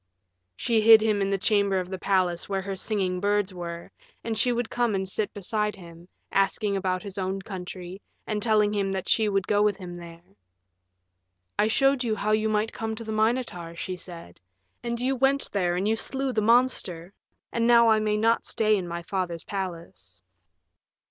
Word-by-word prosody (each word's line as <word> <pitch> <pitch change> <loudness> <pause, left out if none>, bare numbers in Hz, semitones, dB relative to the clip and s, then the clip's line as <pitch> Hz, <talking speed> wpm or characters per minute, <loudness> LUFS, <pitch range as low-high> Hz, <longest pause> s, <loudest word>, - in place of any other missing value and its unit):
She 225 - +1
hid 225 0 +9
him 215 -2 +1
in 195 - +1
the 195 - +1
chamber 200 -1 +2
of 180 - -4
the 190 - -4
palace 185 -3 0
where 195 -1 -1
her 195 0 -4
singing 190 -2 -1
birds 205 0 0
were, 170 -1 -7 0.3
and 225 -1 -2
she 245 +4 +2
would 240 -1 -2
come 240 -4 +1
and 190 0 -2
sit 205 +2 -2
beside 210 +1 -2
him, 170 -2 -13 0.2
asking 195 +1 +1
about 185 -1 -1
his 200 -1 -7
own 190 +1 -2
country 185 -1 -8 0.2
and 210 -1 -2
telling 215 -2 +3
him 200 -2 0
that 190 -1 -4
she 220 -2 +3
would 195 -1 0
go 205 0 +2
with 210 -2 +2
him 180 -3 -8
there. 170 -1 -11 1.4
"I 210 - +4
showed 270 +3 +2
you 225 -3 0
how 215 +1 -1
you 215 0 +2
might 215 +1 0
come 220 0 -4
to 230 - -8
the 220 - -5
Minotaur," 215 -6 -1
she 185 +2 -4
said, 170 - -11 0.4
"and 235 0 -3
you 260 +2 0
went 270 +2 +1
there 180 -3 0
and 190 +3 0
you 220 - +2
slew 265 +3 -2
the 215 - +1
monster, 210 -7 +1 0.4
and 230 0 +1
now 235 -1 +6
I 220 -1 +5
may 210 0 0
not 230 +2 +2
stay 215 -1 +2
in 180 -2 -4
my 170 0 -5
father's 175 -2 -3
palace." 165 - -7
205 Hz, 195 wpm, -26 LUFS, 185-220 Hz, 1.4 s, hid